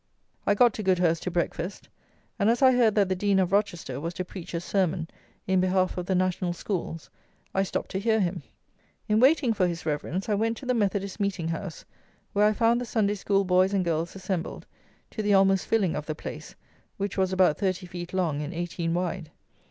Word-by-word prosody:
I 205 - +4
got 240 +1 +5
to 215 - -5
Goudhurst 180 -3 +2
to - - -2
breakfast, 175 +1 -3 0.5
and 205 +1 +3
as 240 +4 +2
I 260 - +8
heard 240 -4 +3
that 205 -2 +4
the 185 - 0
Dean 200 +1 +1
of 185 -1 +2
Rochester 175 -10 0
was 165 +3 -4
to 185 - -3
preach 180 -1 -8
a - - 0
sermon 175 -2 0 0.4
in 190 -1 +2
behalf 185 0 +1
of 180 -1 -4
the 190 - +1
National 180 -1 0
Schools, 170 -3 -4 0.4
I 195 - +2
stopped 195 - -3
to 190 - -1
hear 220 +2 +2
him. 180 -2 -1 0.7
In 215 0 +3
waiting 265 -1 +4
for 185 -4 +2
his 170 -1 -4
Reverence 160 +4 -2
I 215 - +1
went 225 +2 0
to 275 - -9
the 250 - +1
Methodist 200 -3 -1
Meeting 195 -5 -1
house, 165 +1 -5 0.5
where 205 +1 +4
I 215 - +3
found 235 +2 +2
the - - -3
Sunday 215 -3 +1
School 195 -1 +1
boys 185 +2 +3
and 185 -2 +1
girls 165 +1 -1
assembled, 185 -3 -4 0.5
to 220 - -3
the 205 -1 +3
almost 195 -1 +3
filling 205 -7 +1
of 150 - -5
the 155 - -3
place, - - -8 0.4
which 200 -1 -3
was 190 -1 +1
about 185 -5 +3
thirty 185 -1 -1
feet 175 -1 -7
long 170 -6 0
and 150 +3 -5
eighteen 170 -1 -2
wide. 180 -2 -2
190 Hz, 210 wpm, -27 LUFS, 175-205 Hz, 0.7 s, I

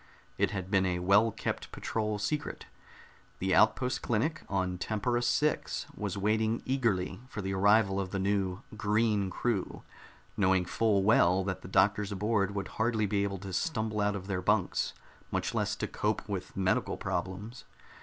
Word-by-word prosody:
It 100 -1 +3
had 95 -2 -5
been 95 -2 +3
a 90 -1 0
well 100 +5 +4
kept - - -4
patrol 105 -1 -2
secret; 145 +9 -3 0.7
the 95 0 0
outpost 125 0 +3
clinic 140 +7 0
on 95 -2 -1
Tempera 120 +5 0
VI 150 +5 +2 0.4
was 100 -2 -3
waiting 110 +3 +1
eagerly 115 -9 0
for 105 -6 -6
the 95 0 -2
arrival 100 0 +4
of 95 -1 -2
the 95 - -3
new 95 -1 0
"green" 105 -2 +1
crew, 105 -1 -2 0.5
knowing 95 -2 +3
full 100 +1 +2
well 95 -3 +4
that 95 -1 -3
the - - -9
doctors 100 +2 +2
aboard 100 0 0
would 100 -2 -2
hardly 110 -1 +2
be 100 0 +1
able 100 -1 -2
to 95 0 -8
stumble 110 - -1
out 105 0 +1
of 95 -2 -5
their 95 -2 -2
bunks, 100 0 +1 0.4
much - - -2
less - - 0
to - - -3
cope - - -2
with - - -5
medical 95 -1 +1
problems. 95 +5 -4
100 Hz, 165 wpm, -30 LUFS, 95-110 Hz, 0.7 s, well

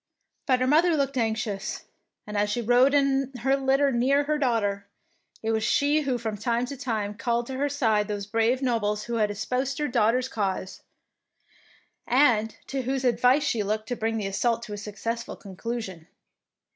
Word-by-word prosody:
'^ - - -54
But 255 -2 +3
her - - +3
mother 320 +4 +4
looked 275 -1 0
anxious, 220 -3 -2 0.4
and 210 - -7
as 205 0 +1
she 210 - -1
rode 245 +4 +4
in 275 -1 +2
her 270 +3 +3
litter 275 +1 +2
near 265 +4 +2
her 300 +1 -1
daughter, 205 -7 0 0.6
it 225 - 0
was 220 -1 0
she 290 +6 +2
who 265 -4 -1
from 220 -3 -4
time 235 +3 0
to 280 - -6
time 220 -6 -2
called 235 +2 -1
to 260 +1 -5
her 285 +2 0
side 220 -7 +1
those 205 -1 -3
brave 230 +5 +1
nobles 210 -4 0
who 235 +1 -3
had 210 -2 +2
espoused 250 +6 -2
her 300 - 0
daughter's 245 +1 +2
cause, 195 -5 -3 1.3
and 235 -5 +3
to 270 - -3
whose 260 +1 -2
advice 250 +4 +3
she 240 -6 0
looked 215 +2 -2
to 245 - -1
bring 225 0 -1
the 210 - -2
assault 230 +4 0
to 215 -3 -7
a - - -5
successful 220 +3 -5
conclusion. 195 -4 -6
235 Hz, 185 wpm, -26 LUFS, 215-265 Hz, 1.3 s, mother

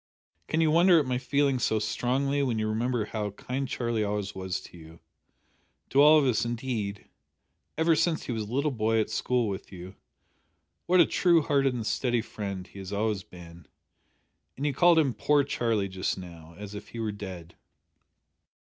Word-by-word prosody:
"Can 160 - 0
you 160 -1 +3
wonder 170 +2 +6
at 150 - 0
my 125 -1 -1
feeling 140 0 +1
so 110 - +1
strongly 130 +6 0
when 125 -5 0
you 110 0 -1
remember 115 +1 -1
how 105 -1 -3
kind 130 +7 -4
Charlie 115 -3 -1
always 105 -1 -3
was 95 -1 -3
to - - -14
you 80 -1 -14 0.9
to 140 - +5
all 150 +2 +8
of 150 - +3
us 120 -5 +2
indeed 115 -4 -3 0.7
ever 160 +1 +3
since 165 +1 +1
he - - -5
was 115 -2 -2
a 105 +1 -7
little 140 +4 0
boy 115 -2 +1
at 110 - -1
school 125 -2 0
with 95 -1 -6
you; 90 0 -9 0.9
what 180 +1 +4
a - - +8
true 170 -3 +3
hearted 135 -4 +1
and 115 -3 -4
steady 120 0 0
friend 100 -5 -6
he 100 - -13
has 95 0 -8
always 105 -1 -1
been. 85 -3 -14 0.9
And 140 - -3
you 145 - +1
called 175 +4 +5
him 145 -6 +3
poor 145 +7 +2
Charlie 115 -7 -1
just 95 0 -3
now, 85 -3 -11
as 105 0 -8
if 105 0 -8
he 115 - -9
were 110 -2 -1
dead." 95 -5 -9
115 Hz, 185 wpm, -28 LUFS, 100-140 Hz, 0.9 s, all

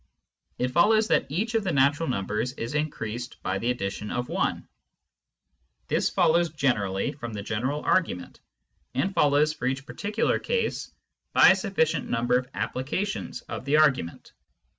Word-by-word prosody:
It 125 - 0
follows 215 - +4
that - - +2
each 205 +11 -2
of 225 -2 +1
the 190 - -1
natural 145 +2 +2
numbers 105 +3 -2
is 115 -1 -5
increased 125 -6 -3
by 95 +1 -1
the 120 - -1
addition 105 -3 -3
of 125 0 -3
i. - - 0 1.3
This - - +1
follows 170 +1 +3
generally 110 -11 0
from 120 -5 -7
the 100 -1 -5
general 130 +8 -2
argument, 130 - 0 0.6
and 190 +10 0
follows 150 -1 +3
for 125 - -3
each 135 +1 -2
particular 210 +8 -1
case 470 -1 -2 0.4
by - - +8
a 190 - +6
suflficient 165 -7 0
number 120 +1 +1
of 125 0 -9
applications 165 +11 -3
of - - -7
the 140 +3 +1
argu 150 - +4
ment. 85 - -12
140 Hz, 155 wpm, -26 LUFS, 120-165 Hz, 1.3 s, by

